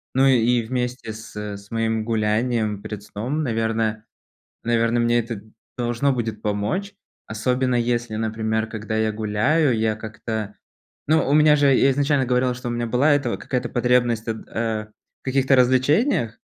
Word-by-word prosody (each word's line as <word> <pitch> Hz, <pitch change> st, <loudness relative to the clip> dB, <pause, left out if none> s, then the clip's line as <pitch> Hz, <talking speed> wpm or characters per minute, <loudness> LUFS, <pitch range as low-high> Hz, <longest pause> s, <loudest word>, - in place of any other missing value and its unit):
Ну, 135 Hz, +1 st, +4 dB
и 120 Hz, -2 st, +3 dB
вместе 125 Hz, -1 st, -3 dB
с 110 Hz, 0 st, -11 dB
с 100 Hz, -1 st, -6 dB
моим 115 Hz, -1 st, -1 dB
гулянием 110 Hz, -1 st, 0 dB
перед 105 Hz, -1 st, -7 dB
сном, 125 Hz, +10 st, -3 dB
наверное 110 Hz, -2 st, -1 dB, 0.6 s
наверно, 115 Hz, 0 st, +1 dB
мне 120 Hz, 0 st, +3 dB
это 115 Hz, -1 st, -4 dB
д 105 Hz, +2 st, -16 dB, 0.3 s
должно 120 Hz, +3 st, +1 dB
будет 110 Hz, -4 st, -3 dB
помочь. 105 Hz, -, -2 dB, 0.3 s
Особенно 125 Hz, +4 st, 0 dB
если, 120 Hz, -1 st, 0 dB
например, 110 Hz, 0 st, -1 dB
когда 110 Hz, 0 st, -5 dB
я 110 Hz, 0 st, +1 dB
гуляю, 110 Hz, +7 st, +1 dB
я 110 Hz, -1 st, 0 dB
как-то 110 Hz, -1 st, -5 dB, 0.5 s
ну, 155 Hz, -2 st, +2 dB
у 140 Hz, -, +3 dB
меня 150 Hz, 0 st, +6 dB
же, 145 Hz, -1 st, +3 dB
я 135 Hz, -, +4 dB
изначально 140 Hz, 0 st, +2 dB
говорил, 125 Hz, 0 st, +1 dB
что 125 Hz, 0 st, -6 dB
у -, -, -2 dB
меня 120 Hz, 0 st, -2 dB
была 130 Hz, +6 st, +3 dB
эта 145 Hz, -, 0 dB
вот -, -, -3 dB
какая-то 125 Hz, -2 st, -2 dB
потребность 120 Hz, -2 st, +1 dB
от 110 Hz, -1 st, -5 dB
а, 110 Hz, -2 st, -2 dB, 0.3 s
в -, -, -60 dB
каких-то 135 Hz, 0 st, +2 dB
развлечениях, 130 Hz, -, +2 dB
115 Hz, 165 wpm, -22 LUFS, 110-125 Hz, 0.6 s, меня